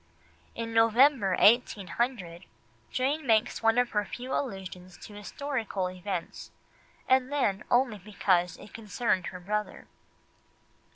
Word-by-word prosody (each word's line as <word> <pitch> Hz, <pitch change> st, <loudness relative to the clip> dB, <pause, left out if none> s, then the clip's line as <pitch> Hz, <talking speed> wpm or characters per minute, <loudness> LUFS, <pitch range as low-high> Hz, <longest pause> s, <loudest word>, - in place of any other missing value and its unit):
In 230 Hz, 0 st, -5 dB
November 225 Hz, -2 st, +4 dB
1800, 205 Hz, -4 st, +1 dB, 0.4 s
Jane 275 Hz, +3 st, -1 dB
makes 220 Hz, -2 st, +2 dB
one 225 Hz, +1 st, +3 dB
of 245 Hz, -1 st, +2 dB
her 210 Hz, -1 st, +1 dB
few 245 Hz, +6 st, -6 dB
allusions 185 Hz, -7 st, -5 dB
to 210 Hz, -, -12 dB
historical 205 Hz, -3 st, -3 dB
events, 185 Hz, -1 st, -5 dB, 0.6 s
and 260 Hz, +1 st, +3 dB
then 215 Hz, -9 st, 0 dB
only 245 Hz, -4 st, +2 dB
because 180 Hz, -3 st, 0 dB
it 205 Hz, -, -14 dB
concerned 220 Hz, -3 st, -1 dB
her 180 Hz, -, -7 dB
brother. 210 Hz, +4 st, -4 dB
215 Hz, 115 wpm, -28 LUFS, 190-245 Hz, 0.6 s, November